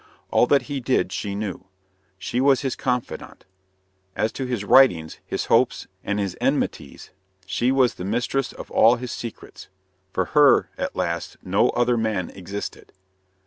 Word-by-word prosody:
All 120 - +4
that 140 - +3
he 145 -2 -4
did 130 +1 0
she 100 -2 -3
knew. 100 -2 -5 0.5
She 120 +6 -2
was 135 -1 +4
his 135 -3 -2
confidante. 125 -2 -4 0.7
As 110 +1 0
to 130 - -4
his 120 -5 -2
writings, 90 -10 +4
his - - -2
hopes, - - +2 0.2
and 100 - -2
his 100 -3 -2
enmities, - - -2 0.3
she 110 +7 0
was 130 -2 +3
the - - -8
mistress 120 +6 -1
of - - -10
all 115 +2 +5
his 125 0 -6
secrets. 115 -2 -8 0.4
For 95 - 0
her, 145 -3 +5
at - - -4
last, - - -3
no - - +2
other 120 0 +1
man 110 -6 -1
existed. 100 +2 -7
120 Hz, 155 wpm, -23 LUFS, 100-130 Hz, 0.7 s, all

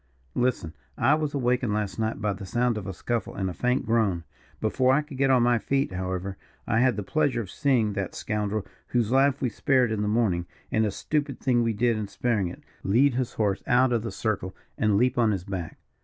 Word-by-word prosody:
"Listen. 120 -10 0 0.2
I 130 +5 +4
was 150 -1 -1
awakened 125 -4 +1
last 105 -3 -2
night 110 -1 -1
by 105 -1 0
the 100 - -9
sound 120 +5 0
of 105 -3 -5
a - - -2
scuffle 115 +5 -3
and 95 -1 -2
a - - -7
faint 125 +7 0
groan. 105 -7 +1 0.4
Before 130 +4 +2
I 150 - +2
could 150 -3 -10
get 135 0 +3
on 130 -2 +5
my 120 -1 +3
feet, 135 0 0
however, 95 +1 -3 0.3
I 110 - +1
had 125 -2 +3
the 105 - -3
pleasure 145 +1 +1
of 95 - -8
seeing 125 -8 +1
that 100 -2 -3
scoundrel, 105 -1 -2 0.2
whose 120 -2 0
life 135 +1 +3
we 125 - +2
spared 125 +1 +2
in 110 -2 -1
the 105 - 0
morning 105 -6 +1 0.2
and 110 -1 +2
a - - 0
stupid 145 +5 -2
thing 125 -3 +2
we 115 -1 +1
did 115 +1 +1
in 105 -1 -3
sparing 105 -1 0
it 85 - -9 0.2
lead 125 +8 +3
his 125 0 -2
horse 105 -3 0
out 125 0 +4
of 115 - +1
the 115 - -4
circle 100 -4 -2 0.2
and 105 -2 +2
leap 125 +2 +2
on 115 -2 +4
his 95 -4 -1
back. 95 -4 -5
115 Hz, 225 wpm, -26 LUFS, 100-125 Hz, 0.4 s, on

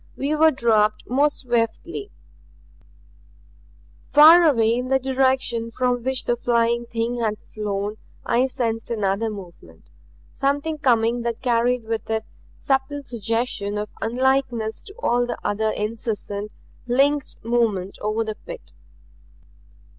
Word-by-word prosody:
We 285 +3 -1
were 320 +1 +6
dropped 220 -6 +1
more 280 +4 +3
swiftly. 250 - -2 2.0
Far 320 +3 +8
away 230 -5 +3
in 250 +2 -2
the 265 +1 +3
direction 260 -3 0
from 245 +1 0
which 260 +1 -1
the 240 - +1
Flying 235 0 +1
Thing 235 +1 -2
had 215 -2 -1 0.2
flown 205 0 -3 0.3
I 245 +3 +2
sensed 230 -4 -3
another 210 -1 0
movement; 195 -5 -12 0.4
something 285 +3 -1
coming 235 -3 +2
that 235 +1 -4
carried 245 0 +2
with 225 0 -4
it 220 0 -1 0.3
subtle 275 +1 -1
suggestion 225 -3 -2
of 210 0 -3
unlikeness 245 -2 0
to 400 - -13
all 245 - +1
the 245 - -3
other 220 +1 0
incessant, 210 -1 -4 0.4
linked 275 +3 +2
movement 220 -5 0
over 215 +2 0
the 220 -1 -4
pit. - - -10
235 Hz, 125 wpm, -23 LUFS, 220-265 Hz, 2.0 s, Far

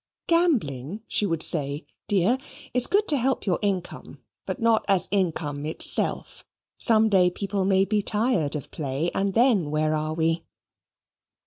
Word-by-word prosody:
"Gambling," 215 - 0
she 210 - 0
would 165 -3 +1
say, 145 -1 +3 0.2
"dear, 205 +6 +1 0.3
is 250 0 +4
good 410 +1 +1
to 295 - +5
help 265 +1 -1
your 185 -4 0
income, 190 -4 -4 0.3
but - - -4
not 230 -1 +2
as 195 -2 +1
an 200 - +2
income 145 -4 -6
itself. 160 - +1 0.4
Some 220 -1 +4
day 185 -4 +3
people 195 +1 -3
may 195 0 +2
be 210 +1 0
tired 205 - 0
of 145 - -7
play, 145 +3 -3
and 195 0 -2
then 225 - +2
where 155 +1 0
are 155 0 -3
we?" 165 +1 -1
190 Hz, 155 wpm, -24 LUFS, 155-220 Hz, 0.4 s, to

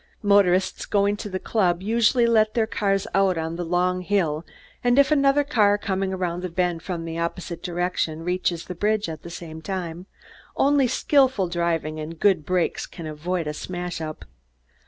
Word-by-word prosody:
Motorists, 195 -2 +3
going 200 0 +2
to 205 - -6
the 185 - -3
club, 185 -3 0
usually 235 +3 +3
let 220 -2 +3
their 225 -2 +3
cars 195 -3 0
out 195 -2 +3
on 160 0 -3
the 175 - -3
long 180 +2 0
hill 170 -5 0 0.4
and 245 +1 +3
if 280 +1 +5
another 280 0 +4
car, 205 -7 +3
coming 195 -2 -2
around 180 -2 -2
the 185 - -4
bend 175 -1 -1
from 170 -1 -4
the 165 0 -4
opposite 170 0 -4
direction, 175 -2 -2
reaches 180 -1 -1
the 180 - -6
bridge 210 +4 0
at 160 -2 -6
the 170 - -9
same 160 -2 -8
time, 175 0 -5 0.5
only 280 -2 +3
skilful 260 -5 +2
driving 170 -3 -1
and 160 +1 -7
good 185 -7 +2
brakes 180 -2 0
can 170 - -9
avoid 165 +3 -3
a 150 - -3
smash 175 +1 -5
up. 155 -1 -6
180 Hz, 175 wpm, -24 LUFS, 170-205 Hz, 0.5 s, if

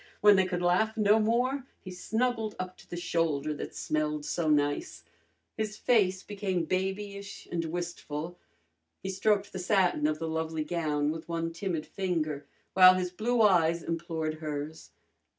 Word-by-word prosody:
When 205 -1 +8
they 190 -1 +3
could 180 -1 -2
laugh 220 +6 +2
no 210 0 +5
more 250 +5 +1
he 185 - -9
snuggled 220 +3 -1
up 185 0 -5
to - - -18
the 175 - -5
shoulder 160 -4 0
that 145 - -7
smelled 150 -1 -1
so 165 -3 -1
nice. 145 - 0 0.5
His 215 -1 -3
face 195 -7 +2
became 195 -4 -2
babyish 200 +2 -3
and 170 -1 -1
wistful. 170 -1 -5 0.6
He 190 - -3
stroked 205 +1 +1
the 190 - -4
satin 180 -5 +2
of 155 0 0
the 165 +1 -4
lovely 160 -1 -2
gown 150 -2 0
with 160 +1 -7
one 165 0 -2
timid 170 -3 -3
finger, 160 -6 -2 0.3
while 185 -1 +9
his 180 -1 -1
blue 225 +5 +1
eyes 170 -4 +4
implored 160 -2 -3
hers. 150 0 -5
175 Hz, 155 wpm, -29 LUFS, 160-200 Hz, 0.6 s, while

